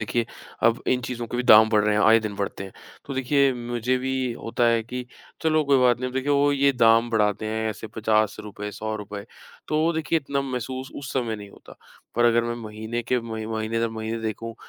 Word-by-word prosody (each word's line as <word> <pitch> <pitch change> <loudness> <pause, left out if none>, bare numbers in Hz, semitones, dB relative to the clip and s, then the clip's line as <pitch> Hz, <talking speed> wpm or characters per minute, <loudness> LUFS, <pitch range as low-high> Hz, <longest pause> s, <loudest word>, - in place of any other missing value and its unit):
देखिए, 115 +2 -1 0.4
अब 115 +1 +3
इन 125 - +2
चीज़ों 120 -1 -4
के 120 - -5
भी 125 - 0
दाम 110 -3 +8
बढ़ 105 -1 +4
रहे 105 - +2
हैं, 105 - +2
आए 115 +1 +6
दिन 105 -2 -4
बढ़ते 100 0 -4
हैं, 95 - -10 0.3
तो 140 - -6
देखिए 135 +1 +2
मुझे 120 +1 -1
भी 130 +1 -2 0.2
होता 115 +1 -2
है 115 -1 +3
कि 125 +2 -6 0.4
चलो 155 -1 +3
कोई 140 -1 +4
बात 125 -2 +4
नहीं, 130 - -1
अब - - -8
वो - - -14
देखिए 140 +2 -2
वो 145 0 +3
ये 140 0 +3
दाम 115 -1 +4
बढ़ाते 105 -1 +1
हैं 110 0 -1
ऐसे 110 +1 -7
₹50, 105 -1 -1
₹100 105 -1 -5 0.4
तो 155 - 0
वो 165 +1 +2 0.2
इतना 140 -2 -1
महसूस 130 0 -4
उस 135 -1 -6
समय 120 -4 -1
नहीं 100 -1 -10
होता। - - -16 0.4
पर 120 +1 +2
अगर 120 0 +4
मैं 120 0 -2
महीने 110 +1 -5
के 125 - +3
म 115 0 -9 0.2
महीने-दर-महीने 110 0 -2
देखूँ, 115 +1 -4
115 Hz, 215 wpm, -24 LUFS, 110-130 Hz, 0.4 s, दाम